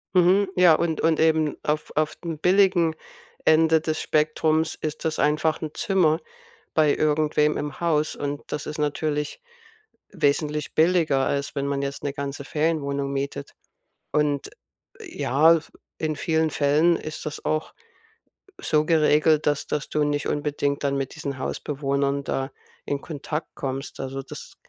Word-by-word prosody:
Mhm, 185 +2 +4
ja 180 -2 +7
und 160 0 -1
und 160 -1 +2
eben 160 -1 +2
auf 150 +1 -1
auf 155 0 0
dem 165 -3 -5
billigen 180 -2 +3 0.5
Ende 160 0 +5
des 155 0 -2
Spektrums 155 +1 +1
ist 155 +1 -5
das 160 - -1
einfach 155 +2 +1
'n 155 - -4
Zimmer 165 -5 +2 0.6
bei 150 -2 +4
irgendwem 150 0 +2
im 145 0 -5
Haus 155 -3 +1
und 145 0 -4
das 150 - -3
ist 150 - -5
natürlich 150 - -2 0.7
wesentlich 150 -3 0
billiger 160 -5 +3
als 140 +1 -2
wenn 140 - -1
man 140 0 -1
jetzt 140 0 -4
'ne 140 - -2
ganze 140 0 -5
Ferienwohnung 140 -3 -1
mietet. 140 0 -4 0.6
Und, 145 -2 +1 0.5
äh, - - -10
ja, 155 +6 +5
f 160 - -11 0.3
in 155 -1 -1
vielen 160 +1 +1
Fällen 150 +4 +3
ist 155 0 -6
das 150 - -7
auch 155 0 -1 0.9
so 155 0 +1
geregelt, 155 -1 +3
dass 145 -1 +1
dass 150 - -3
du 150 -1 +1
nicht 145 0 -1
unbedingt 145 -1 -1
dann 140 -1 0
mit 135 -1 -3
diesen 140 -3 -5
Hausbewohnern 140 0 -1
da 135 0 -2 0.4
in 140 -1 -2
Kontakt 150 0 -5
kommst. 135 0 -5
Also, 135 0 -4
das - - -9
150 Hz, 150 wpm, -24 LUFS, 140-160 Hz, 0.9 s, ja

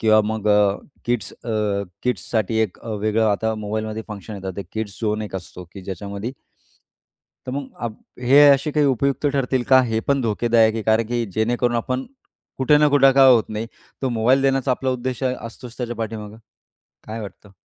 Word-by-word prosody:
किंवा 110 -1 +5
मग 110 -1 -2
अ, 105 -1 +4 0.3
किड्स 120 -6 -1
अ, 105 -3 -1 0.2
किड्साठी 110 -1 -1
एक 105 - -3
अ, - - -11
वेगळं 110 +2 +1
आता 110 +2 0
मोबाईलमध्ये 110 +1 -4
फंक्शन 105 +1 -7
येतात, 95 -1 -5
ते 100 - -3
किड्स 110 -3 -5
झोन 110 -1 -1
एक 100 -2 -5
असतो 90 0 -9
की 100 - -8
ज्याच्यामध्ये 100 +5 -6 1.1
तर 125 - -4
मग 140 0 -4
अ, 120 - -1 0.3
हे 135 +4 +6
असे 140 +2 +4
काही 150 -1 +2
उपयुक्त 140 +2 +1
ठरतील 135 -3 0
का? 130 -1 +7
हे 110 -2 -1
पण 140 -1 +3
धोकेदायक 115 0 +2
आहे, 110 - -2
कारण 110 +1 +2
की 120 -1 0
जेणेकरून 120 +2 +1
आपण 130 +3 -2 0.5
कुठे 135 +3 +4
ना 150 - +5
कुठे 135 -2 +5
काय 135 -1 +7
होत 115 -3 +4
नाही 110 +1 -4 0.4
तो 130 - +1
मोबाईल 125 +3 +2
देण्याचा 135 -1 +1
आपला 130 +1 0
उद्देश 130 +1 -3
असतोच 125 -1 -4
त्याच्या 120 -2 -4
पाठीमागे 110 -1 -5 0.7
काय 110 +1 -5
वाटतं? 100 0 -10
115 Hz, 180 wpm, -22 LUFS, 105-130 Hz, 1.1 s, का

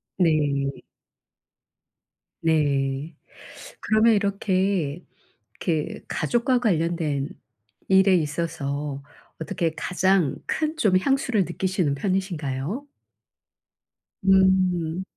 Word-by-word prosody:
네. 145 -5 +1 1.7
네. 145 -2 0 0.7
그러면 220 +1 +4
이렇게, 195 -5 0 0.6
이렇게 160 -3 -2
가족과 240 - +1
관련된 165 - 0 0.6
일에 190 0 +5
있어서 150 -3 -3 0.4
어떻게 160 0 -2
가장 180 -4 +1
큰 310 0 -1
좀 205 -10 +3
향수를 250 -2 +1
느끼시는 180 -3 -1
편이신가요? 180 - -2 1.4
음. 185 -3 +3
175 Hz, 165 characters per minute, -24 LUFS, 150-195 Hz, 1.7 s, 일에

